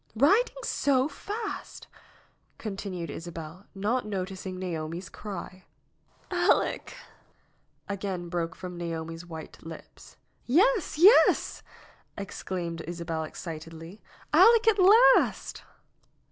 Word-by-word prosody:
"Biding 405 Hz, -, +3 dB
so 270 Hz, -1 st, +2 dB
fast 420 Hz, +9 st, -6 dB, 0.4 s
!" -, -, -33 dB, 0.3 s
continued 195 Hz, -6 st, -5 dB
Isabel, 165 Hz, +3 st, -8 dB
not 215 Hz, +6 st, 0 dB
noticing 190 Hz, -2 st, -5 dB
Naomi's 170 Hz, 0 st, -4 dB
cry. 190 Hz, -2 st, -8 dB, 0.7 s
"Aleck -, -, +1 dB, 0.5 s
!" -, -, -42 dB
again 190 Hz, -3 st, -4 dB
broke 170 Hz, -1 st, -3 dB
from 180 Hz, -2 st, -8 dB
Naomi's 165 Hz, 0 st, -5 dB
white 160 Hz, -2 st, -9 dB
lips. 165 Hz, 0 st, -12 dB, 0.3 s
"Yes! 380 Hz, -, +3 dB
yes!" 385 Hz, +9 st, +5 dB, 0.6 s
exclaimed 175 Hz, -4 st, -5 dB
Isabel 165 Hz, -2 st, -3 dB
excitedly. 165 Hz, +3 st, -9 dB, 0.3 s
"Aleck 460 Hz, -1 st, +6 dB
at 430 Hz, -2 st, +4 dB
last 420 Hz, +7 st, +5 dB
185 Hz, 95 wpm, -28 LUFS, 165-255 Hz, 0.7 s, Aleck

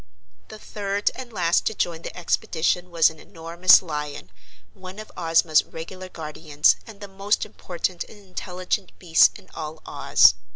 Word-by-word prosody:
The 215 Hz, -, -10 dB
third 205 Hz, -1 st, -2 dB
and 255 Hz, -2 st, -9 dB
last 175 Hz, -5 st, +1 dB
to 220 Hz, -, -1 dB
join 165 Hz, -3 st, -2 dB
the -, -, -8 dB
expedition 175 Hz, +1 st, 0 dB
was 165 Hz, -2 st, +4 dB
an 160 Hz, -, -16 dB
enormous 170 Hz, +4 st, +4 dB
lion, 150 Hz, -, -6 dB, 0.4 s
one 185 Hz, +1 st, -11 dB
of 215 Hz, 0 st, -9 dB
Ozma's 165 Hz, -2 st, +3 dB
regular 185 Hz, +3 st, -9 dB
guardians 155 Hz, -2 st, +1 dB
and 210 Hz, -2 st, -12 dB
the 205 Hz, -, -7 dB
most 195 Hz, +2 st, -1 dB
important 175 Hz, 0 st, -4 dB
and 220 Hz, -, -15 dB
intelligent 185 Hz, 0 st, -4 dB
beast 165 Hz, -3 st, +4 dB
in -, -, -18 dB
all 155 Hz, 0 st, -6 dB
Oz. -, -, +5 dB
175 Hz, 155 wpm, -24 LUFS, 160-195 Hz, 0.4 s, Oz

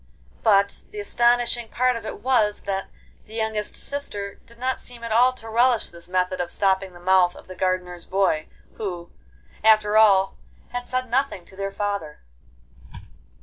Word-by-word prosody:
But 200 Hz, -2 st, +3 dB
the 210 Hz, -, -8 dB
astonishing 240 Hz, +2 st, +2 dB
part 255 Hz, +1 st, +2 dB
of 225 Hz, -2 st, -6 dB
it -, -, -7 dB
was 225 Hz, -5 st, +2 dB
that 195 Hz, -1 st, -3 dB, 0.4 s
the 220 Hz, -, -11 dB
youngest 220 Hz, -2 st, -1 dB
sister 205 Hz, -8 st, -3 dB
did 235 Hz, -, -17 dB
not 255 Hz, +2 st, -1 dB
seem 240 Hz, -1 st, -9 dB
at 230 Hz, -, -5 dB
all 245 Hz, +3 st, +5 dB
to 225 Hz, -3 st, -11 dB
relish 235 Hz, +1 st, +2 dB
this 170 Hz, 0 st, -12 dB
method 185 Hz, 0 st, 0 dB
of 175 Hz, -, -3 dB
stopping 190 Hz, -1 st, +1 dB
the 175 Hz, -, -13 dB
mouth 180 Hz, 0 st, +3 dB
of -, -, -14 dB
the 185 Hz, -, -8 dB
gardener's 180 Hz, -1 st, -2 dB
boy, 185 Hz, -5 st, +1 dB, 0.3 s
who, 175 Hz, -5 st, -5 dB, 0.5 s
after 215 Hz, -1 st, +5 dB
all, 195 Hz, -3 st, +5 dB, 0.3 s
had 245 Hz, 0 st, -5 dB
said 255 Hz, 0 st, -1 dB
nothing 250 Hz, -7 st, -1 dB
to 190 Hz, -, -17 dB
their 195 Hz, 0 st, -3 dB
father. 200 Hz, -7 st, -3 dB
210 Hz, 165 wpm, -24 LUFS, 190-235 Hz, 0.5 s, all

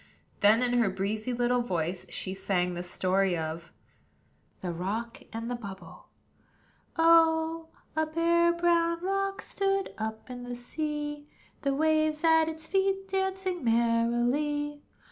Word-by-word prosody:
Then, 215 Hz, +4 st, +5 dB
in 245 Hz, 0 st, +1 dB
her 225 Hz, -4 st, +3 dB
breezy 210 Hz, +5 st, -2 dB
little 245 Hz, 0 st, +1 dB
voice, 180 Hz, -4 st, -2 dB
she 185 Hz, +2 st, -5 dB
sang 180 Hz, -2 st, 0 dB
the 175 Hz, -, -4 dB
story 185 Hz, +1 st, +1 dB
of 160 Hz, +1 st, -5 dB, 0.9 s
THE 180 Hz, -, -3 dB
ROCK 210 Hz, +7 st, -4 dB
AND 230 Hz, +1 st, -5 dB
THE 245 Hz, -, -2 dB
BUBBLE. 195 Hz, -7 st, -9 dB, 0.9 s
Oh! 325 Hz, 0 st, +4 dB, 0.3 s
a 315 Hz, 0 st, +1 dB
bare, 340 Hz, +2 st, +3 dB
brown 340 Hz, -1 st, +2 dB
rock 390 Hz, +1 st, -1 dB
Stood 390 Hz, 0 st, -1 dB
up 220 Hz, 0 st, -4 dB
in 250 Hz, -1 st, -7 dB
the 245 Hz, 0 st, -5 dB
sea, 295 Hz, +3 st, -4 dB, 0.3 s
The 275 Hz, -1 st, 0 dB
waves 310 Hz, +1 st, +2 dB
at 320 Hz, -1 st, +5 dB
its 320 Hz, 0 st, -7 dB
feet 385 Hz, +1 st, 0 dB
Dancing 380 Hz, -2 st, -1 dB
merrily. 240 Hz, +6 st, +1 dB
275 Hz, 130 wpm, -29 LUFS, 220-330 Hz, 0.9 s, Then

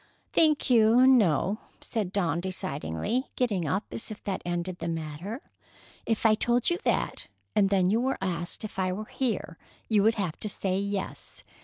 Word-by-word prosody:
"Thank 310 Hz, -3 st, +3 dB
you, 230 Hz, +2 st, +6 dB
no," 210 Hz, -, +4 dB, 0.2 s
said 210 Hz, -6 st, -3 dB
Dawn 175 Hz, -4 st, +1 dB
decidedly, 185 Hz, -, -2 dB
getting 205 Hz, -10 st, 0 dB
up 195 Hz, +6 st, 0 dB
as -, -, -5 dB
if 215 Hz, -, -8 dB
that 195 Hz, -2 st, -2 dB
ended 175 Hz, +1 st, -3 dB
the 165 Hz, -, -3 dB
matter. 165 Hz, -, -5 dB, 0.6 s
"If 225 Hz, 0 st, 0 dB
I 220 Hz, -, +7 dB
told 240 Hz, +5 st, +2 dB
you 345 Hz, -, 0 dB
that, -, -, -1 dB, 0.3 s
and 200 Hz, -2 st, +4 dB
then 190 Hz, -2 st, +3 dB
you 225 Hz, +3 st, +2 dB
were 265 Hz, +2 st, 0 dB
asked 175 Hz, +1 st, -3 dB
if 210 Hz, -2 st, -6 dB
I 185 Hz, -1 st, +1 dB
were 215 Hz, +3 st, -5 dB
here, 220 Hz, -9 st, -3 dB, 0.3 s
you 215 Hz, -3 st, +3 dB
would 220 Hz, +3 st, +4 dB
have 185 Hz, -7 st, -3 dB
to 210 Hz, -, -3 dB
say 190 Hz, -1 st, -1 dB
yes. 200 Hz, -1 st, -4 dB
200 Hz, 175 wpm, -28 LUFS, 180-225 Hz, 0.6 s, I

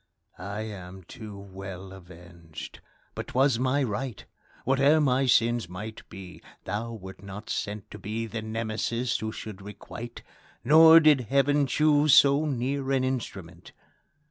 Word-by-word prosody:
I 100 Hz, +4 st, -5 dB
am 95 Hz, -3 st, -8 dB
too 105 Hz, +3 st, -10 dB
well 95 Hz, -1 st, -9 dB
avenged! 85 Hz, -3 st, -12 dB, 0.3 s
but -, -, -6 dB
'twas 130 Hz, -2 st, +2 dB
my 130 Hz, +2 st, +1 dB
right; 125 Hz, -1 st, -4 dB, 0.4 s
Whate'er 140 Hz, +4 st, +4 dB
my 135 Hz, -2 st, +2 dB
sins 120 Hz, -5 st, +2 dB
might 105 Hz, +5 st, -7 dB
be, 95 Hz, -2 st, -11 dB, 0.2 s
thou 115 Hz, +4 st, -4 dB
wert 95 Hz, -3 st, -10 dB
not 100 Hz, +2 st, -8 dB
sent 105 Hz, -1 st, -4 dB
To 105 Hz, -, -9 dB
be 110 Hz, +4 st, -4 dB
the 115 Hz, 0 st, -5 dB
Nemesis 115 Hz, +2 st, -2 dB
who 110 Hz, 0 st, -4 dB
should 105 Hz, -2 st, -8 dB
requite 115 Hz, +4 st, -9 dB, 0.4 s
Nor 160 Hz, +5 st, +8 dB
did 150 Hz, -4 st, +5 dB
Heaven 140 Hz, +1 st, +3 dB
choose 150 Hz, +1 st, +4 dB
so 140 Hz, +1 st, +5 dB
near 135 Hz, +1 st, -2 dB
an 135 Hz, -1 st, +2 dB
instrument. 95 Hz, -10 st, -5 dB
115 Hz, 140 wpm, -27 LUFS, 95-135 Hz, 0.4 s, Nor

